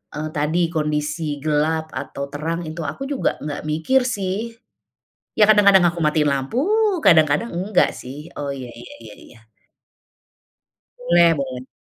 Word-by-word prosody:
eee, 155 +1 -4
tadi 165 +3 0
kondisi 150 -1 -2
gelap 155 +1 0
atau 140 +1 -6
terang, 165 +4 -3
itu 160 +2 -6
aku 270 - -5
juga 280 -2 -1
enggak 150 -1 -5
mikir 160 +13 +1
sih. 210 +1 -3 0.8
Ya, 210 - +5
kadang-kadang 200 -3 +6
aku 170 0 -3
matiin 150 0 +2
lampu, 135 - -2 0.5
kadang-kadang 160 +4 +4
enggak 185 +2 +1
sih. 145 +5 -9
Oh, 140 -1 -3
iya 130 -2 -7
iya 120 - -12
iya 105 -2 -12
iya. 120 - -17 1.6
Boleh 170 0 +4
boleh. 130 -2 -5
155 Hz, 135 wpm, -21 LUFS, 145-175 Hz, 1.6 s, kadang-kadang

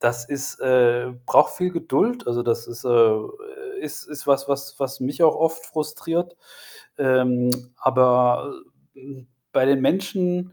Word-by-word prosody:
das 120 +1 -1
ist 140 -1 -5
äh, 125 -1 +2
braucht - - +4
viel 180 0 -1
Geduld. 175 - -1
Also, 120 0 -1
das 115 -1 -1
ist 120 +1 -10
äh, 125 - -1
äh, 115 -2 +3 0.5
ist - - -7
ist 150 -2 -10
was, 140 -1 +2
was 140 0 -3
was 135 0 -4
mich 135 +5 -3
auch 160 -2 +6
oft 165 +1 -1
frustriert. 165 +3 -4 0.6
Ähm, 125 -2 +2 0.3
aber, 125 -1 +3 0.4
äh 135 - -20
hm, 130 -1 -14 0.2
bei 130 - +3
den 135 0 +3
Menschen, 180 +2 -1
135 Hz, 155 wpm, -22 LUFS, 125-165 Hz, 0.6 s, auch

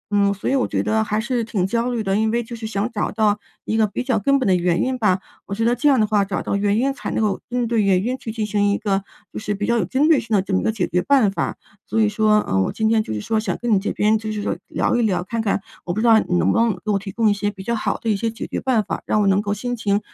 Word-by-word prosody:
嗯， 200 0 +3
所 200 - -5
以 - - +1
我 260 - +1
觉 - - -1
得 220 0 +1
还 210 0 -1
是 235 0 -1
挺 205 -5 -1
焦 235 +4 0
虑 235 -3 -2
的。 195 0 0
因 220 +1 +2
为 235 +1 0
就 235 +1 -8
是 225 -1 -6
想 215 +2 -2
找 - - -1
到 210 -2 +1 0.3
一 220 - -1
个 220 -1 +3
比 250 - -4
较 250 -5 +1
根 275 +7 +3
本 260 - -1
的 185 - +4
原 175 -1 +1
因 260 0 -1
吧， 195 -4 +3 0.3
我 200 - -4
觉 225 +1 0
得 240 +1 +3
这 295 +2 +2
样 265 -4 +4
的 215 - +4
话 210 -1 +2
找 195 -1 -3
到 - - -1
原 205 +1 +1
因 270 +3 +1
才 - - -6
能 - - -1
够 205 -2 0
针 245 -1 0
对 230 -2 +1
原 195 -1 +2
因 250 +2 -1
去 225 - -6
进 220 -1 -2
行 205 -1 +1
一 200 - +1
个 195 -1 -1 0.3
就 - - -4
是 210 -1 -3
比 205 +1 -2
较 235 - +1
有 - - 0
针 280 +4 +1
对 315 -5 +5
性 225 -2 -2
的 190 - +2
这 195 - -4
么 - - +3
一 - - -4
个 220 - +1
解 205 -5 -1
决 180 - 0
办 225 -2 +3
法。 - - -3 0.3
所 225 - -1
以 215 - +4
说， 210 0 +3
呃， 95 0 0
我 - - 0
今 220 -1 0
天， 220 -1 +3
就 - - -6
是 105 -1 -3
说 220 - 0
想 200 -5 -2
跟 235 -2 0
你 195 - +4
这 200 - -2
边， 215 +1 +2
就 215 -1 -4
是 210 -1 -3
说 - - -1
聊 - - 0
一 240 - +2
聊， 190 -5 +1
看 230 +4 -3
看 200 -2 -1 0.2
我 175 - -3
不 215 - -2
知 235 - 0
道 225 -1 +7
你 180 - -1
能 - - +2
不 230 - +2
能 230 -2 +3
给 215 - 0
我 200 - +1
提 195 0 -7
供 225 +1 +1
一 205 - +4
些 205 0 -1
比 190 -2 -9
较 235 - -1
好 225 - -1
的 230 - -8
一 - - +2
些 225 +3 -1
解 225 - -6
决 - - -4
办 245 -5 +2
法， - - -4
让 215 - +2
我 - - +2
能 195 +1 +3
够 205 0 -2
心 245 +4 -3
情， 205 -2 0
215 Hz, 365 characters per minute, -21 LUFS, 200-230 Hz, 0.3 s, 道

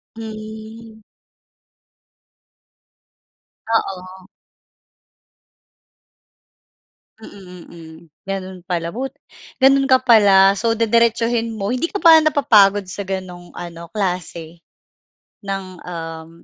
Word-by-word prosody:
Hmm. 220 0 -10 2.7
Oo. 190 -4 -3 2.9
Mm, 185 -5 -13
mm. 165 -2 -13 0.3
Gano'n 190 -2 -6
pala 170 -1 -4
but 265 +2 -4 0.5
gano'n 275 +1 +5
ka 260 - +6
pala, 200 -6 +5
so 225 +3 -1
didiretsuhin 230 +1 +1
mo. 210 -3 -4
Hindi 255 +9 -2
ka 410 - -3
ba 335 -3 +7
napapagod 205 -10 +3
sa 195 +2 -6
gano'ng 185 -2 -7
ano, 170 -1 -10
klase 175 -4 -5 0.8
ng 195 -1 -4 0.2
um, 165 -2 -8
200 Hz, 85 wpm, -19 LUFS, 180-230 Hz, 2.9 s, ba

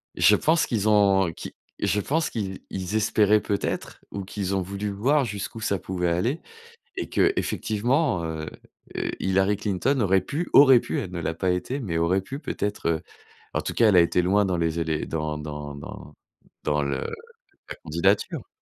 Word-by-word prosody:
Je - - +6
pense 160 +1 +2
qu'ils 110 -3 0
ont 95 -4 +4
qu'ils - - -8 0.3
je 105 - +1
pense 160 - 0
qu'ils 95 -4 -4
ils 95 +2 -4
espéraient 105 -1 +3
peut 100 -1 -1
être, - - -4
ou 100 -1 -4
qu'ils 100 0 -3
ont 95 - +1
voulu 100 +3 -4
voir 135 +8 +2
jusqu'où 105 0 -5
ça 100 -3 0
pouvait 90 -2 -2
aller 115 - 0 0.6
et - - -3
que, 395 0 +3
effectivement, 120 - 0
heu 80 -1 -4 0.5
heu, - - -2
Hillary 95 +1 +2
Clinton 105 +7 0
aurait 95 -2 +3
pu 155 - -4
aurait 135 -3 +8
pu - - -3
elle 90 - -5
ne 90 - -4
l'a 80 - -2
pas 90 +3 -1
été, 90 +10 -2
mais 90 -10 -3
aurait 85 +4 +2
pu 135 +8 -7
peut-être, 105 - -3
heu. 80 -1 0 0.5
En - - 0
tout - - -4
cas, 115 - +4
elle 100 - +4
a 85 - +8
été 85 +1 +2
loin 100 +3 +3
dans 90 -2 0
les 85 0 0
élé 80 -2 -1
dans 75 -1 -2
dans 75 -1 -6
dans 70 +1 -10 0.5
dans 75 -1 +1
le 70 -1 -1 0.7
la - - -5
candidature. - - 0
95 Hz, 190 wpm, -25 LUFS, 85-110 Hz, 0.7 s, aurait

